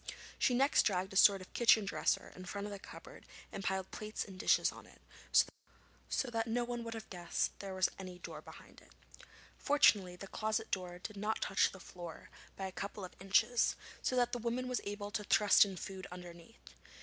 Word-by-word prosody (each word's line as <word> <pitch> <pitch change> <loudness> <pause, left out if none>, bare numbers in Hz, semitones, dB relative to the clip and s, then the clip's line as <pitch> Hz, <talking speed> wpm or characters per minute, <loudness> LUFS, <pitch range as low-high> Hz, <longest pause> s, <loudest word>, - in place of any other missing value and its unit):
She 250 - +3
next 275 +3 +4
dragged 190 -1 0
a - - -9
sort 195 0 +7
of 185 - -13
kitchen 230 -3 +5
dresser 200 - 0
in 185 - -9
front 200 +2 -4
of 205 - -5
the 200 - -7
cupboard - - -12 0.3
and 195 - -6
piled 190 -1 -2
plates 215 0 -4
and 190 -2 -11
dishes - - +4
on - - -13
it, - - -18 1.1
so 255 - -1
that 225 0 -1
no 240 +2 0
one 240 0 -4
would 230 0 -5
have 220 - -7
guessed 175 -2 -1
there 195 -1 -6
was 185 0 +3
any 185 -2 -7
door 165 -3 -8
behind. - - -14 0.8
Fortunately 210 -11 +4
the 185 - -8
closet 215 +2 -2
door 180 -2 -3
did 205 +3 -8
not 210 +2 -1
touch 195 - +2
the 190 - -11
floor 175 -2 -10 0.2
by 195 - -4
a 190 - -4
couple 200 +1 -5
of 180 - -11
inches, 225 +5 +3 0.3
so 255 - 0
that 245 -1 +3
the 245 - -2
woman 240 +2 -2
was 250 -1 -1
able 205 0 -4
to 210 0 -2
thrust 210 0 +6
in 195 -2 -6
food 190 -1 -7
underneath. 175 +3 -12
200 Hz, 200 wpm, -35 LUFS, 185-225 Hz, 1.1 s, sort